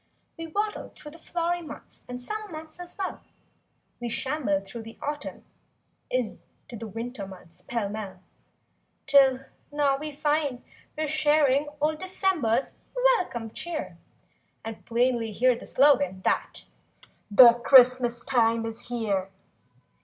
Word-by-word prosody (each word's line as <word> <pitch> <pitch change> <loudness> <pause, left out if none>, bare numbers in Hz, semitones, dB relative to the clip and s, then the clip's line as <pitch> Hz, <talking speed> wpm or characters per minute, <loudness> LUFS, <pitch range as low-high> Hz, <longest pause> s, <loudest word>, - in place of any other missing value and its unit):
We 330 0 -6
waddled 415 +6 -3
through 300 - -11
the 330 - -14
flowery 345 +1 -2
months 295 -3 -11
And 250 0 -6
summer 425 +6 -5
months 315 +1 -9
as 350 0 -10
well; 385 -2 -4 0.8
We 240 0 -4
shambled 235 -7 -1
through 235 +4 -8
the 225 +1 -11
Autumn 295 0 -5 0.6
in— 250 -4 -2 0.3
To 230 -2 -7
winter 225 -1 -6
months, 180 -3 -12
pell 230 -4 -2
mell; 200 -3 -6 0.9
'Till 270 -2 +5 0.3
now 290 -2 +2
we 305 +1 -5
find 290 -3 -1 0.3
we're 310 0 -1
sharing 295 -2 +3
old 305 +1 0
December's 350 - 0 0.5
welcome 235 -10 -5
cheer 340 +4 -5 0.7
And 225 -1 -7
plainly 235 -2 +1
hear 250 +4 +3
the - - -10
slogan, 190 -10 +3
that— - - -1 0.7
"The 235 +3 +9
Christmas 250 -2 +6
time 230 -2 +2
is 225 0 -7
here." 210 -6 -1
255 Hz, 130 wpm, -27 LUFS, 225-305 Hz, 0.9 s, The